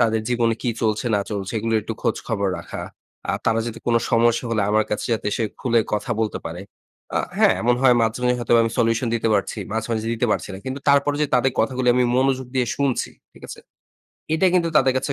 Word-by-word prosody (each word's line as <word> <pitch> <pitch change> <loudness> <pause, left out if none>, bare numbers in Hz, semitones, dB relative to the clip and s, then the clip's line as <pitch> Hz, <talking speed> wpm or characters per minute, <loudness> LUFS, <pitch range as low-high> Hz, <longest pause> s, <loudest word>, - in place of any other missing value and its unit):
তাদের 110 -2 +2
জীবনে 120 -2 +1
কি 120 - 0
চলছে, 110 +2 0
না 100 - +1
চলছে 100 -1 -4
এগুলোর 110 0 +1
একটু 115 - -5
খোঁজখবর 100 -4 -1
রাখা। - - -7 0.5
আ - - 0
তারা 115 0 +2
যাতে 115 -1 -5
কোন 120 - +2 0.2
সমস্যা 115 +1 +3
হলে 110 -3 +1
আমার 110 0 +3
কাছে 105 - -2
যাতে 110 - -2
এসে 115 - -1 0.2
খুলে 120 -2 +2
কথা 105 +4 -2
বলতে 110 - -1
পারে। 85 +2 -6 0.6
আ - - +3 0.2
হ্যাঁ? - - +6
এমন 120 +1 +3
হয় 125 -2 +6
মাঝে, 110 +2 0
মাঝেই 125 0 +2
হয়তোবা 120 -1 +3
আমি 115 - -2
সলিউশন 115 +1 +1
দিতে 115 0 0
পারছি। 100 - -1
মাঝে, 110 0 -2
মাঝে, 110 0 -2
দিতে 120 +2 0
পারছি - - -3
না। - - -7
কিন্তু 130 +1 -4
তারপরও 140 +1 +3
যে 150 - +2
তাদের 125 +1 +3
কথাগুলি 130 -1 0
আমি 125 0 +3
মনোযোগ 130 -1 +1
দিয়ে 125 -2 +1
শুনছি। 140 -3 0 0.2
ঠিক - - -19
আছে? - - -9 0.7
এটা 185 +4 +3
কিন্তু 170 -2 +3
তাদের 135 -2 +4
কাছে 140 +2 -1
115 Hz, 220 wpm, -22 LUFS, 110-130 Hz, 0.7 s, হ্যাঁ